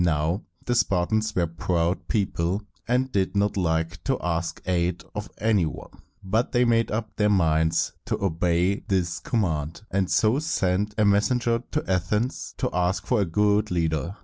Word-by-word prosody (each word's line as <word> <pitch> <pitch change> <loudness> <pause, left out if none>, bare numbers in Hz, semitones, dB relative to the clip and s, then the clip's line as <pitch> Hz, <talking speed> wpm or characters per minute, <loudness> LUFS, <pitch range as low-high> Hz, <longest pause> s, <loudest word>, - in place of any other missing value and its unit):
Now, 85 +3 +1 0.2
the 120 - +1
Spartans 110 0 +1
were 90 - +2
a - - 0
proud 85 +2 -1
people, 95 -1 0 0.2
and 125 +2 +1
did 95 -1 0
not 100 +1 +1
like 80 -2 -1
to - - +1
ask 85 -1 -2
aid 85 -1 0
of 105 0 -5
any 105 -6 +2
one; - - -8 0.3
but 110 +6 0
they 125 0 +4
made 115 -1 +2
up 110 0 -3
their 105 -1 +3
minds 80 -4 +2
to - - -2
obey 90 +1 +1
this 90 -4 0
command, 85 -6 -2
and 95 -1 0
so 110 +5 +3
sent 105 - 0
a 105 - +3
messenger 115 +3 +2
to 155 - 0
Athens 100 +7 -1
to - - -1
ask 90 +2 0
for 125 -4 +2
a - - +2
good 105 +4 +2
leader. 85 +1 -1
95 Hz, 170 wpm, -25 LUFS, 85-105 Hz, 0.3 s, they